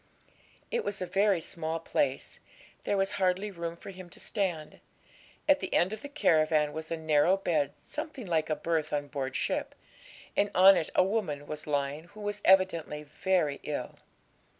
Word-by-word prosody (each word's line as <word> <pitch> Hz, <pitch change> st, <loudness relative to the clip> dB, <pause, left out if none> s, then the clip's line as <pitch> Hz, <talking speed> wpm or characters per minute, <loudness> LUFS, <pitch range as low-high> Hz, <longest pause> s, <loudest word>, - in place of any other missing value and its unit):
It 470 Hz, -1 st, 0 dB
was 200 Hz, -, -3 dB
a 185 Hz, -, -2 dB
very 195 Hz, +1 st, +2 dB
small 165 Hz, 0 st, -3 dB
place; 285 Hz, -, -1 dB, 0.5 s
there 200 Hz, -, +1 dB
was 195 Hz, 0 st, +1 dB
hardly 190 Hz, +1 st, 0 dB
room 170 Hz, -2 st, -5 dB
for 195 Hz, -, -9 dB
him 185 Hz, -1 st, -11 dB
to -, -, -13 dB
stand. 175 Hz, -8 st, -2 dB, 0.7 s
At 290 Hz, -1 st, +5 dB
the -, -, -5 dB
end 185 Hz, +4 st, +3 dB
of 220 Hz, -, -6 dB
the 285 Hz, -, -7 dB
caravan 155 Hz, -, +2 dB
was 160 Hz, 0 st, -6 dB
a 165 Hz, -, -2 dB
narrow 160 Hz, +3 st, +3 dB
bed 155 Hz, -7 st, 0 dB
something 300 Hz, -5 st, -6 dB
like 160 Hz, -4 st, 0 dB
a 155 Hz, -, +1 dB
berth 160 Hz, -2 st, -1 dB
on 145 Hz, -1 st, -1 dB
board 135 Hz, -2 st, -3 dB
ship, -, -, -1 dB, 0.6 s
and 205 Hz, -, +2 dB
on 190 Hz, +2 st, +9 dB
it 165 Hz, -3 st, -1 dB
a -, -, +6 dB
woman 185 Hz, -8 st, -1 dB
was 150 Hz, 0 st, -6 dB
lying 145 Hz, +1 st, -1 dB
who 205 Hz, +5 st, -13 dB
was 205 Hz, 0 st, -3 dB
evidently 170 Hz, -6 st, +3 dB
very 150 Hz, -1 st, 0 dB
ill. 145 Hz, -4 st, -5 dB
170 Hz, 175 wpm, -30 LUFS, 155-195 Hz, 0.7 s, on